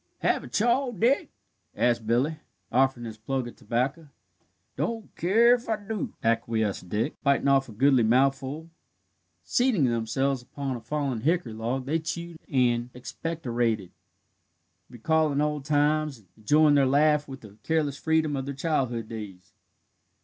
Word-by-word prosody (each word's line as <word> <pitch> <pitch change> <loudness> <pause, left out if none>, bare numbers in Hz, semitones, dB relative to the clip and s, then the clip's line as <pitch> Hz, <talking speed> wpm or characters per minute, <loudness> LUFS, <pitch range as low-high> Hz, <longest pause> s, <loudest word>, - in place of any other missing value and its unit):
"Have - - +1
a - - -8
chaw, 245 +4 +1
Dick?" 240 +6 +1 0.5
asked 120 -2 +1
Billy, 130 +7 +1 0.3
offering 130 -1 +2
his 110 -1 -8
plug 130 +2 -2
of 120 - -10
tobacco. 135 +7 -2 0.7
"Don't 225 -2 -4
keer 225 +7 +4
if 245 -1 -2
I 220 - +2
do," 210 -2 -5
acquiesced 115 -5 0
Dick, 110 - -2
biting 140 -1 +2
off 135 -2 +3
a - - -9
goodly 130 +3 +3
mouthful. 135 +6 +1 0.7
Seating 245 - +2
themselves 125 +3 0
upon 135 +1 -5
a 120 - -7
fallen 140 -6 -2
hickory 160 -4 0
log, 120 +4 -3
they 155 +4 0
chewed 170 +1 -5
and 120 -3 +2
expectorated, 120 - -2 1.0
recalling 150 +3 +1
old 150 -1 -1
times, 150 -1 +1
and 105 -4 -23
enjoying 150 +8 +4
their 140 -2 +4
laugh 150 +2 +3
with 135 -1 -9
the 105 -1 -15
careless 150 -1 -1
freedom 160 -2 +1
of 135 -1 -3
their 140 - -4
childhood 130 -7 -1
days. 100 -5 -9
135 Hz, 145 wpm, -27 LUFS, 120-155 Hz, 1.0 s, keer